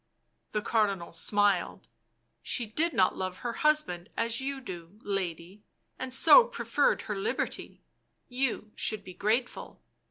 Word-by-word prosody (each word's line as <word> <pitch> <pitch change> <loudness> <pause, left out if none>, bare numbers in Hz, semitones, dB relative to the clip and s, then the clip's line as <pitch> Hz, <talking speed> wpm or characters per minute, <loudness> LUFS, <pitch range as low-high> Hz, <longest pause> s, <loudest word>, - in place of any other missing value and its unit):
The 210 -1 -1
Cardinal 200 -7 0
smiled. 200 +1 +1 0.3
" - - -47
She 240 - -2
did 310 +11 0
not 190 -9 +2
love 185 -1 -4
her 240 -1 -4
husband 300 - 0
as 230 +1 0
you 275 0 -3
do, 185 -4 -9
lady, 190 -1 -4 0.4
and 260 0 -5
so 370 - +8
preferred - - 0
her - - -4
liberty; 420 +4 -4 0.4
you 245 -4 -2
should 215 -2 -1
be 185 - -10
grateful. 225 +6 -2
215 Hz, 135 wpm, -29 LUFS, 185-260 Hz, 0.4 s, so